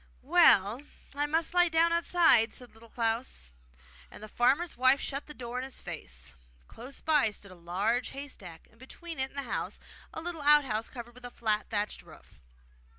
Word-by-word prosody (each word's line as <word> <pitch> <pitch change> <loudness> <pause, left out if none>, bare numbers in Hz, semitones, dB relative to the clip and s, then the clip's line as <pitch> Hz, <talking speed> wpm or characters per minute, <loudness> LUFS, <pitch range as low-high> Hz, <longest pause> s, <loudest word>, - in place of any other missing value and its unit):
'Well, 255 - +5 0.3
I 290 +1 -1
must 325 +3 0
lie 355 -1 +4
down 330 +1 +3
outside,' 335 -8 +4
said 250 -1 -11
Little 225 +1 -16
Klaus; 225 - -2 0.6
and - - -12
the - - -7
farmer's 275 +10 +1
wife 260 +2 +4
shut 275 +1 -5
the 300 - -9
door 245 0 -5
in - - -4
his 265 0 -6
face. - - -7 0.3
Close 250 +4 -9
by 300 -7 +3
stood 200 -1 -12
a - - -10
large 195 +8 -1
haystack, 210 - -8
and 225 - -25
between 325 +5 -9
it 265 0 0
and 280 - -17
the 280 - -1
house - - -3 0.3
a - - -5
little 330 -1 -5
out 295 0 +6
house, 220 -2 -2
covered 240 -1 -9
with 250 +1 -15
a - - -6
flat 215 -3 -1
thatched 210 -1 -2
roof. - - -18
250 Hz, 190 wpm, -30 LUFS, 220-295 Hz, 0.6 s, out